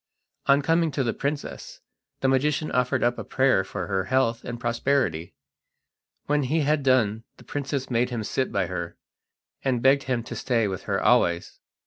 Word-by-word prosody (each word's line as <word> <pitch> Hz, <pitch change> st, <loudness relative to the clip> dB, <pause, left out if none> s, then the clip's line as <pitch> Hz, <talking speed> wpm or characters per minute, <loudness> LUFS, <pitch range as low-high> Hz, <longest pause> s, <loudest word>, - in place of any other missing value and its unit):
On 140 Hz, +1 st, +5 dB
coming 165 Hz, +1 st, +2 dB
to 140 Hz, -, 0 dB
the 115 Hz, -, 0 dB
princess 145 Hz, +1 st, -5 dB, 0.4 s
the 135 Hz, -, +2 dB
magician 145 Hz, +3 st, +1 dB
offered 125 Hz, -1 st, +1 dB
up 120 Hz, 0 st, +1 dB
a -, -, -4 dB
prayer 130 Hz, -7 st, +2 dB
for 95 Hz, -1 st, -5 dB
her 95 Hz, -1 st, -1 dB
health 120 Hz, -1 st, +1 dB
and 120 Hz, -1 st, -6 dB
prosperity. 115 Hz, -, 0 dB, 0.9 s
When 150 Hz, 0 st, +1 dB
he 150 Hz, +4 st, +1 dB
had 150 Hz, +1 st, +2 dB
done 115 Hz, -5 st, +2 dB
the -, -, -15 dB
princess 140 Hz, -2 st, -4 dB
made 120 Hz, +1 st, +2 dB
him 120 Hz, -3 st, -3 dB
sit 130 Hz, +5 st, -1 dB
by 100 Hz, -2 st, 0 dB
her, 85 Hz, -1 st, -5 dB, 0.6 s
and 130 Hz, -3 st, 0 dB
begged 135 Hz, +1 st, +4 dB
him 125 Hz, -3 st, -1 dB
to -, -, -7 dB
stay 115 Hz, -4 st, +1 dB
with 95 Hz, -2 st, -5 dB
her -, -, +1 dB
always. 85 Hz, 0 st, +2 dB
125 Hz, 175 wpm, -25 LUFS, 110-140 Hz, 0.9 s, On